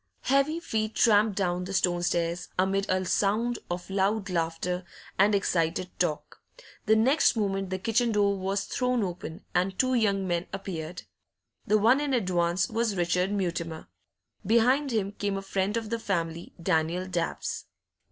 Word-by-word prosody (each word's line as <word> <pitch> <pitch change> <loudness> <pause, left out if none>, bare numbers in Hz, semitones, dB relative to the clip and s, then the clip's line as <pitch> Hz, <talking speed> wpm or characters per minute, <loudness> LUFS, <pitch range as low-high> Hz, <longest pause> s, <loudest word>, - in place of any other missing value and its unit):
Heavy 275 +5 +2
feet 220 -9 -2
tramped 215 -2 +4
down 180 -2 0
the 195 - -6
stone 175 -2 +2
stairs, 170 0 -1
amid 195 +2 +1
a 185 0 +1
sound 220 +6 +1
of 175 +1 -4
loud 195 +1 0
laughter 170 +2 -1 0.4
and 205 +2 +5
excited 180 -2 0
talk. 165 -4 -2 0.5
The 220 - +6
next 260 +6 +4
moment 195 -3 -1
the 185 - -2
kitchen 230 +4 +1
door 200 -1 +2
was 195 +1 -1
thrown 250 -3 0
open, 175 -3 -6
and 185 +1 0
two 255 0 +2
young 200 -5 +1
men 175 0 -1
appeared. 180 -3 -5 0.6
The 215 - +4
one 235 +7 +4
in 285 -3 0
advance 180 -4 +1
was 225 -2 -1
Richard 180 +2 +1
Mutimer; 170 - -3 0.5
behind 245 +7 +3
him 210 -5 -1
came 200 -1 -2
a 195 - -5
friend 195 +2 -1
of 225 -1 -4
the 230 - -1
family, 170 -5 -3
Daniel 170 +1 0
Dabbs. 175 -3 -3
195 Hz, 155 wpm, -28 LUFS, 180-220 Hz, 0.6 s, The